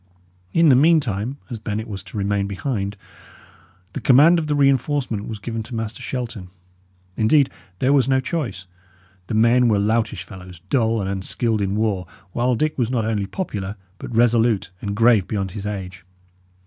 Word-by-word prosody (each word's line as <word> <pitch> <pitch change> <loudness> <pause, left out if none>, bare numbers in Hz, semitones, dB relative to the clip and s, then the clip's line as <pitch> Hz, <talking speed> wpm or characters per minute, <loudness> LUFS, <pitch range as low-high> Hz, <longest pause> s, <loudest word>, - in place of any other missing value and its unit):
In 165 -1 +4
the 130 - +7
meantime, 135 - +2
as 115 - -4
Bennet 110 +1 -4
was 100 -3 -6
to - - -9
remain 100 0 0
behind, 100 0 -3 1.0
the - - -4
command 150 +7 +6
of 155 - -3
the 150 - +1
reinforcement 135 -5 +1
was 110 - -5
given 115 +2 -4
to 115 +2 -8
Master 115 +2 -4
Shelton. 120 -7 -5 0.7
Indeed, 135 +5 +3 0.3
there 130 +6 +2
was 135 -3 +3
no 130 0 +4
choice; 130 - -3 0.6
the 110 - -2
men 120 +3 +4
were 110 -3 +3
loutish 110 +2 0
fellows, 90 -3 -11
dull 115 -4 +2
and 95 - -3
unskilled 105 +3 -1
in 100 0 -1
war, 105 -5 -1 0.2
while 125 +5 +1
Dick 155 +4 -1
was 120 -2 +1
not 120 -4 0
only 105 -3 -1
popular, 100 - -4 0.2
but 120 - -7
resolute 115 -4 +3
and 100 -1 -3
grave 115 -3 +4
beyond 100 -3 -2
his 105 0 -5
age. 95 -3 -6
110 Hz, 170 wpm, -22 LUFS, 100-130 Hz, 1.0 s, the